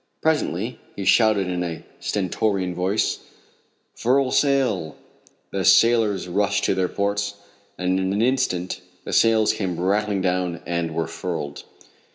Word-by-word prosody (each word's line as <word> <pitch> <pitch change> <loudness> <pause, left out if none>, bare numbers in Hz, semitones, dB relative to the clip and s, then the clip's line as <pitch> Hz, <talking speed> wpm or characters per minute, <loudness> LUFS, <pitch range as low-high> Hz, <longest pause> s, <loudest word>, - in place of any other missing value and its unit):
Presently 125 - 0 0.2
he 100 - -5
shouted 110 -4 +4
in 90 -1 -2
a 85 -2 -5 0.2
stentorian 95 -1 -1
voice: 95 +4 0 0.7
"Furl 130 +2 +1
sail!" 125 - +1 0.6
The - - -2
sailors 115 -5 +4
rushed 100 +2 0
to - - +2
their 90 -1 0
posts, 100 0 -1 0.4
and 90 +1 0
in 95 0 -1
an 100 - 0
instant 120 -8 0 0.2
the - - -6
sails 110 -2 +4
came 95 -6 -3
rattling 100 +2 +1
down 90 -2 -1
and 85 -2 -2
were 80 -1 0
furled. 80 -4 -5
100 Hz, 135 wpm, -23 LUFS, 90-110 Hz, 0.7 s, shouted